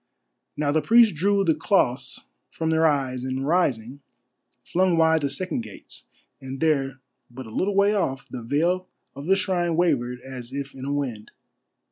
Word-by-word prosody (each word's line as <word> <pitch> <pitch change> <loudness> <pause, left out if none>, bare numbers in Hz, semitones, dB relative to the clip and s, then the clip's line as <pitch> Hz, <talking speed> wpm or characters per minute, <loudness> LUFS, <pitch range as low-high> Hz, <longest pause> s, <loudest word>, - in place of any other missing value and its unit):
Now 145 -1 +1
the 155 +1 +2
priests 230 0 +5
drew 195 +5 +2
the 165 -4 +3
cloths 135 - 0 0.3
from 160 0 -2
their 160 0 +4
eyes, 130 -4 0
and 130 +1 -3
rising, 140 -6 0 0.6
flung 180 -1 +1
wide 160 -1 +4
the 140 - 0
second 165 0 -2
gates, 110 -3 -10 0.3
and 135 0 -7
there, 135 -4 +1 0.3
but 130 +1 -9
a 110 - -11
little 195 - 0
way 200 +1 +4
off, 135 -10 -1
the 125 - -7
veil 170 +9 0 0.3
of 140 +3 -8
the 195 - +5
shrine 180 -3 0
wavered 130 -8 +1
as 130 -1 -9
if 140 0 -5
in 130 0 -8
a 140 - -2
wind. 130 -7 -3
145 Hz, 170 wpm, -24 LUFS, 130-175 Hz, 0.6 s, priests